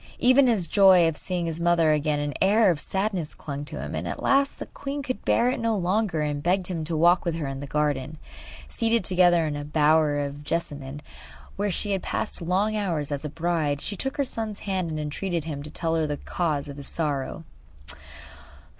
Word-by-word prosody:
Even 255 +2 +5
in 235 - +4
his 185 -5 -1
joy 190 -1 +6
at 165 -1 +1
seeing 180 +1 -3
his 165 0 -3
mother 170 -2 +3
again 150 0 +1
an 145 0 -2
air 205 +1 +5
of 160 - -2
sadness 190 -2 -2
clung 140 -1 -6
to - - -7
him, - - -5
and - - -3
at - - -5
last 275 0 +2
the - - -6
queen 280 +1 -5
could 255 -1 -4
bear 245 +2 +3
it - - -3
no 230 -2 +1
longer, 190 -2 0
and 145 -1 -2
begged 180 +3 +1
him 175 -3 -4
to 160 0 -2
walk 175 +3 +4
with 170 -2 -1
her 160 -3 -3
in 135 0 -5
the 145 - -6
garden. 150 0 -1 0.5
Seated 230 -2 +1
together 175 -2 +4
in 150 -1 -2
a 145 - -4
bower 150 0 +3
of 145 0 -4
jessamine 145 -3 -4 0.5
where 205 +1 -1
she 205 +3 -1
had 195 -2 0
passed - - -3
long 190 +5 +1
hours 170 -9 -1
as 145 0 -3
a 150 - -3
bride 160 -2 -1
she 205 - -3
took 270 +7 -3
her 285 - +2
son's 220 -4 -4
hand 190 -4 -2
and 155 -1 -3
entreated 165 +3 -3
him 145 -3 -5
to 150 - -8
tell 165 +1 -2
her 160 -1 +1
the 145 -1 -2
cause 150 -5 -2
of 140 0 -8
his 140 - -8
sorrow. 150 -1 -3
165 Hz, 215 wpm, -25 LUFS, 150-195 Hz, 0.5 s, joy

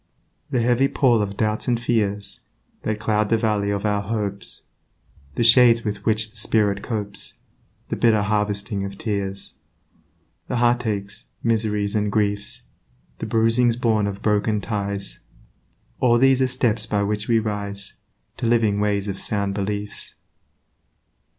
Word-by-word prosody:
The 120 -2 +1
heavy 125 +3 +3
pall 120 -5 +3
of 100 -1 -3
doubts 105 0 0
and 120 -2 +1
fears 105 -4 0 0.4
That 110 -1 -2
clouds 105 0 +1
the 115 - +3
Valley 105 -3 0
of 100 +1 -2
our 105 -1 +1
hopes, 100 -1 -3 0.7
The - - +1
shades 115 -1 +6
with 100 -1 -4
which 110 -1 +1
the 115 - -15
spirit 105 -2 +1
copes, 100 -4 -3 0.5
The - - -1
bitter 110 -3 +3
harvesting 105 -1 -1
of 100 0 -6
tears, 100 -3 -4 0.9
The - - -2
heartaches, 110 -3 0 0.2
miseries, 105 -3 0
and 105 -1 0
griefs, 105 -1 0 0.6
The 110 - -4
bruisings 115 +2 +3
born 110 -4 +1
of 100 0 -6
broken 105 0 +1
ties, 100 - -4 0.8
All 120 -2 +4
these 135 +1 +4
are 130 - +3
steps 120 -4 +1
by 105 -1 0
which 105 +1 -1
we 115 - +3
rise 100 -2 -3 0.4
To - - -2
living 110 -3 +2
ways 105 -1 0
of 100 -1 -4
sound 100 -2 -1
beliefs. 105 +1 -4
105 Hz, 145 wpm, -23 LUFS, 100-115 Hz, 0.9 s, shades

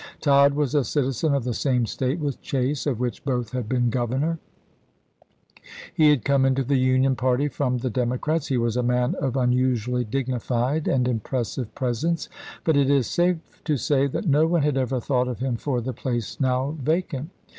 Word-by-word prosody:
Tod 140 -1 +4
was 145 -2 0
a 145 -2 +3
citizen 140 +2 0
of 140 - 0
the 125 0 -2
same 125 0 +1
State 130 +6 -2
with 145 -4 -3
Chase, 135 +2 -1
of 125 -6 -1
which 125 +3 -3
both 125 -5 -2
had 125 -4 -4
been 125 -2 +1
governor; 130 +7 -1 1.5
he 155 -1 +5
had 145 -6 +2
come 140 -1 +3
into 135 0 +2
the 135 +1 +1
Union 130 +1 +3
party 130 +3 +1
from 130 -2 -1
the 125 +1 -2
Democrats; 125 +6 -1
he 130 - 0
was 115 -1 0
a 125 - +1
man 125 0 +1
of 135 -2 -1
un 125 -1 +2
usually 125 -1 +1
dignified 130 +3 -1
and 125 -2 +2
impressive 120 0 -3
presence; 130 +7 -1 0.3
but 160 - +2
it 140 -1 +3
is 140 -3 +3
safe 175 +2 -1
to 150 -3 0
say 140 +3 +1
that 155 +8 -3
no 155 +2 +4
one 170 -2 +2
had 145 -2 +1
ever 130 -1 0
thought 125 +1 0
of 125 -3 -3
him 130 -1 -1
for 125 +1 -2
the 125 +2 -4
place 120 -4 -4
now 130 +2 0
vacant. 155 -1 -1
130 Hz, 190 wpm, -24 LUFS, 125-145 Hz, 1.5 s, he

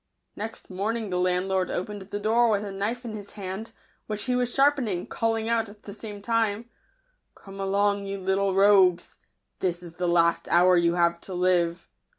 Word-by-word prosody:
Next 220 +2 -7
morning 210 +2 -2
the 180 - 0
landlord 185 +1 +1
opened 205 +3 -4
the 200 +2 -6
door 230 +3 +3
with 210 -1 +1
a 200 - -5
knife 215 +6 -3
in 225 - -5
his 205 -2 -8
hand, 195 +2 -6 0.4
which 210 -1 -3
he 250 +4 0
was 245 -1 0
sharpening, 270 -10 +2
calling 225 -1 -1
out, 230 -2 0
at 205 0 -16
the 200 - -8
same 205 -1 -9
time, 225 0 0 0.3
" - - -46
Come 195 0 -12
along, 200 +1 +1
you 195 0 -3
little 190 0 0
rogues; 190 -3 +4 0.4
this 175 -1 -2
is 170 -1 -11
the 180 0 -1
last 170 -1 +2
hour 180 +1 +5
you 170 0 +3
have 170 -1 +2
to 190 - -7
live." 175 -1 +1
200 Hz, 185 wpm, -26 LUFS, 180-220 Hz, 0.4 s, hour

